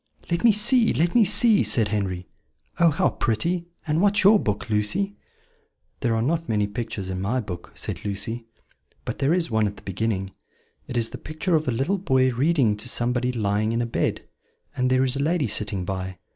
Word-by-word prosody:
"Let 170 - 0
me 235 - +7
see, 225 +3 +4
let 170 +2 +1
me 240 - +5
see," 215 +2 +5
said 110 -5 +1
Henry. 95 -4 -2 0.5
"Oh, 170 - +6
how 145 -2 +1
pretty! 170 +11 -1 0.2
And 155 +1 0
what's 205 0 +3
your 205 +2 +7
book, 105 - -2
Lucy?" 110 - 0 0.8
"There 115 -3 0
are 110 - 0
not 165 +5 -1
many 105 -2 +1
pictures 100 -2 -5
in 90 0 -4
my 110 +7 0
book," 90 -7 -7
said - - -6
Lucy; 115 +3 -4 0.6
"but - - -5
there 140 +2 +2
is 170 -5 +1
one 110 -1 +2
at 100 - -5
the - - -14
beginning: 95 0 -2 0.6
it 125 - -4
is 115 -1 0
the - - -8
picture 155 +4 -3
of 155 -2 0
a - - +2
little 140 - 0
boy 130 -7 +2
reading 135 -4 +2
to 115 +4 -6
somebody 125 +1 0
lying 110 -1 0
in 115 - 0
a 120 - 0
bed; 115 - -2 0.5
and 125 0 +1
there 130 0 +3
is 130 0 +2
a - - -1
lady 160 -1 +1
sitting 100 -3 0
by. 95 0 -4
120 Hz, 200 wpm, -24 LUFS, 105-165 Hz, 0.8 s, me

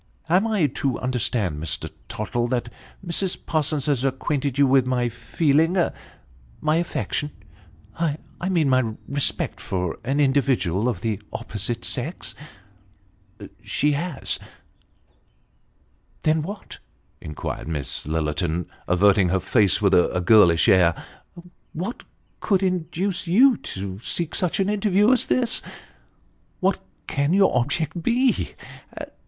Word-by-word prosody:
" - - -33
Am 185 +6 +3
I 210 -7 +2
to 135 -1 -1
understand, 110 -10 -1
Mr. 80 -2 -2 0.2
Tottle, 120 +3 -2
that 120 -1 -2 0.3
Mrs. 180 +2 0
Parsons 155 -3 0
has 140 -4 +1
acquainted 135 0 -1
you 140 - +5
with 130 -1 +3
my 125 -1 +1
feeling 150 - +1 0.8
my 155 - +1
affection 165 -3 -2 0.7
I 155 -3 0 0.3
mean 170 -6 +2
my 130 -4 +2
respect, 140 0 -1
for 90 -3 -3
an 135 +4 -1
individual 130 - +2
of 125 - -4
the 110 -3 -2
opposite 110 +3 -4
sex? 140 +8 -3 0.4
" 95 -1 -35
" - - -14
She 150 +1 +1
has." 150 0 -2 1.3
" - - -39
Then, 155 0 +2
what? 200 +6 -8 0.2
" - - -40
inquired 75 0 -5
Miss 75 -4 -3
Lillerton, 80 +2 -1 0.2
averting 95 +1 +4
her 95 +1 +2
face, 100 +1 +2
with 100 -1 +4
a 90 0 +3
girlish 90 -3 +5
air, 90 -3 +5 0.4
" 175 0 -17
what 190 +9 -4 0.4
could 195 -2 +1
induce 185 +1 -1
you 245 +9 +6
to 95 0 -6
seek 165 +7 -3
such 180 0 -1
an 195 - +2
interview 205 +1 +3
as 255 - +2
this? 245 -2 +2 1.0
What 190 0 +1 0.3
can 140 +4 0
your 195 0 +4
object 155 +6 -1
be 245 +7 +1
135 Hz, 130 wpm, -23 LUFS, -, 1.3 s, you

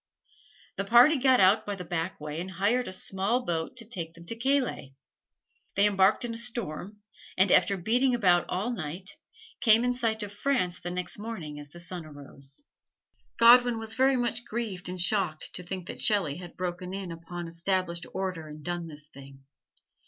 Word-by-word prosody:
The 195 - 0
party 240 +9 +6
got 260 -1 +4
out 190 +3 +5
by 205 - -4
the 180 -2 -7
back 170 +2 -3
way 150 +2 -5
and 185 - -6
hired 205 +7 +1
a - - -4
small 195 +6 -1
boat 165 +7 -2
to 230 - -6
take 170 -7 -5
them 170 0 -13
to 230 - -4
Calais. 245 - 0 0.8
They 200 - +4
embarked 200 +3 +3
in 235 - -4
a 230 - -4
storm, 210 -4 -4 0.4
and 190 0 +4
after 195 +2 +4
beating 245 +7 +2
about 180 -6 +3
all 200 +7 -1
night, 180 -1 -5 0.5
came 230 -3 +5
in 250 0 +2
sight 225 -3 -1
of 205 - -6
France 205 -6 0
the 175 - -5
next 180 +2 -4
morning 175 -10 -6
as 145 0 -10
the 175 - -12
sun 175 0 -6
arose. 140 - -9 0.7
Godwin 240 0 +7
was 225 0 -3
very 265 +2 +3
much 240 0 -1
grieved 215 -7 -4
and 180 0 -5
shocked 180 -4 0
to - - -6
think 180 0 -6
that - - -7
Shelley 180 -9 +2
had 175 -1 -10
broken 180 +1 -4
in 195 -3 -5
upon 170 +1 -7
established 170 0 -1
order 185 -5 -3
and 150 0 -10
done 175 0 -3
this 150 -2 -9
thing. 135 -2 -14
190 Hz, 185 wpm, -28 LUFS, 170-230 Hz, 0.8 s, Godwin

